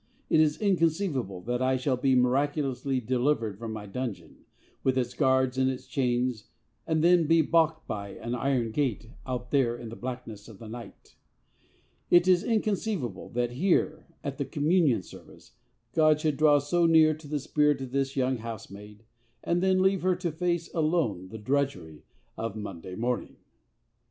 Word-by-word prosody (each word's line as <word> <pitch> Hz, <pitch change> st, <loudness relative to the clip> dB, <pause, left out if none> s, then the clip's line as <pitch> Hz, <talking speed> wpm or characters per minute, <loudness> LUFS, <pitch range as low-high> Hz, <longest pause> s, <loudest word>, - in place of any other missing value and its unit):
It 160 Hz, -, +5 dB
is 150 Hz, -1 st, +3 dB
inconceivable 165 Hz, -, 0 dB
that 120 Hz, +5 st, -2 dB
I 130 Hz, 0 st, +2 dB
shall 130 Hz, +1 st, 0 dB
be 130 Hz, +1 st, +2 dB
miraculously 135 Hz, +1 st, +1 dB
delivered 120 Hz, -3 st, 0 dB
from 115 Hz, -1 st, -5 dB
my 110 Hz, -1 st, -6 dB
dungeon, 115 Hz, +2 st, -6 dB, 0.4 s
with 130 Hz, -1 st, +1 dB
its 125 Hz, -1 st, -1 dB
guards 130 Hz, 0 st, +2 dB
and 130 Hz, 0 st, +3 dB
its 130 Hz, -1 st, -5 dB
chains, 125 Hz, -4 st, -1 dB, 0.4 s
and 160 Hz, -1 st, +1 dB
then 175 Hz, -2 st, +5 dB
be 165 Hz, 0 st, +5 dB
baulked 160 Hz, 0 st, +2 dB
by 100 Hz, -1 st, -5 dB
an 120 Hz, -, -5 dB
iron 125 Hz, -2 st, 0 dB
gate 115 Hz, -4 st, -2 dB, 0.2 s
out 125 Hz, -1 st, -4 dB
there 125 Hz, -4 st, +2 dB
in 120 Hz, -2 st, -8 dB
the 115 Hz, -, -8 dB
blackness 120 Hz, -5 st, -7 dB
of 110 Hz, -4 st, -12 dB
the 110 Hz, -, -10 dB
night. 115 Hz, +2 st, -11 dB, 0.9 s
It 175 Hz, +1 st, +5 dB
is 180 Hz, 0 st, +4 dB
inconceivable 205 Hz, -, -1 dB
that 120 Hz, 0 st, 0 dB
here, 155 Hz, +2 st, 0 dB, 0.2 s
at 140 Hz, -1 st, -5 dB
the 140 Hz, -, -1 dB
Communion 150 Hz, -, +2 dB
Service, -, -, -15 dB, 0.4 s
God 155 Hz, 0 st, +4 dB
should 155 Hz, -2 st, 0 dB
draw 150 Hz, -1 st, +5 dB
so 165 Hz, +4 st, +2 dB
near 160 Hz, -1 st, +6 dB
to 155 Hz, 0 st, -11 dB
the 150 Hz, 0 st, -2 dB
spirit 150 Hz, +1 st, +1 dB
of 130 Hz, -2 st, -6 dB
this 135 Hz, 0 st, -1 dB
young 130 Hz, -1 st, +1 dB
housemaid, 105 Hz, -2 st, -9 dB, 0.4 s
and 175 Hz, +1 st, 0 dB
then 185 Hz, 0 st, +3 dB
leave 190 Hz, -1 st, +2 dB
her 185 Hz, 0 st, +2 dB
to 175 Hz, -2 st, -3 dB
face 170 Hz, +1 st, -2 dB
alone 155 Hz, -, 0 dB
the 110 Hz, -, -8 dB
drudgery 105 Hz, -, -2 dB, 0.3 s
of 115 Hz, -2 st, -4 dB
Monday 95 Hz, -4 st, -7 dB
morning. 120 Hz, +3 st, -2 dB
130 Hz, 165 wpm, -28 LUFS, 120-155 Hz, 0.9 s, near